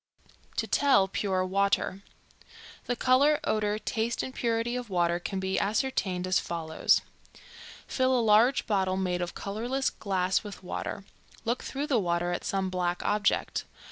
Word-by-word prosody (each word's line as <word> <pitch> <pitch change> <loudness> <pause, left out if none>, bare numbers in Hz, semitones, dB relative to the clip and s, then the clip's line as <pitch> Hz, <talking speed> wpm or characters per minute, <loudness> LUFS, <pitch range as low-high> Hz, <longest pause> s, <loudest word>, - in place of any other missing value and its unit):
TO - - +1
TELL 200 -10 +3
PURE 190 -1 0
WATER. 195 0 +1 0.8
The 245 - -1
color, 275 +5 +4
odor, 210 -1 0
taste 225 +2 -2
and 260 - -5
purity 235 0 -1
of 245 -3 -4
water 175 -2 +1
can 190 +2 -4
be 190 0 0
ascertained 200 -5 0
as 185 0 +2
follows: 160 -2 +1 0.8
Fill 260 -1 +1
a - - +3
large 225 +3 +4
bottle 190 -3 +1
made 180 -2 -1
of 175 -1 -4
colorless 240 +7 -2
glass 190 -1 0
with 205 -2 -9
water; 190 +2 -5 0.4
look 235 +2 0
through 280 +2 -3
the 275 -6 +2
water 175 -2 0
at 175 - -3
some 190 -1 -1
black 180 -1 -1
object. 205 0 0
200 Hz, 150 wpm, -28 LUFS, 185-235 Hz, 0.8 s, color